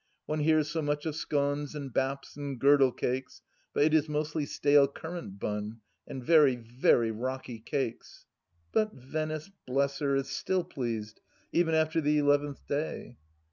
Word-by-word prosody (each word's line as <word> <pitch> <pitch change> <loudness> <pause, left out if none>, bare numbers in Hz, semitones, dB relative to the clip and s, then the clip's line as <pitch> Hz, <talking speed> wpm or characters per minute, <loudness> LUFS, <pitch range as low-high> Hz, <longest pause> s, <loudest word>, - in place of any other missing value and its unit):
One 155 0 -2
hears 155 0 +3
so 160 +1 -2
much 145 0 -1
of 155 -2 -2
scones 145 -1 -1
and 140 -4 -6
baps 135 +1 -2
and 140 -3 -5
girdle 140 -1 +5
cakes, 130 +2 -3 0.3
but - - +2
it 155 +1 +3
is 155 -1 +3
mostly 150 0 -1
stale 145 -1 +4
currant 160 - -7
bun, 105 +2 -4 0.3
and 130 - -6
very, 150 -5 +6
very 120 -1 +2
rocky 125 +1 -4
cakes. 120 0 -4 0.5
But 215 -1 +1
Venice, 155 +6 -4 0.2
bless 140 +2 0
her 140 -2 +1
1 135 - +3
is 135 - -10
still 185 +6 0
pleased, 115 -9 -4 0.3
even 165 -2 +2
after 160 +1 +2
the 150 0 +2
eleventh 145 -1 +1
day. 140 -4 -4
145 Hz, 160 wpm, -30 LUFS, 130-155 Hz, 0.5 s, very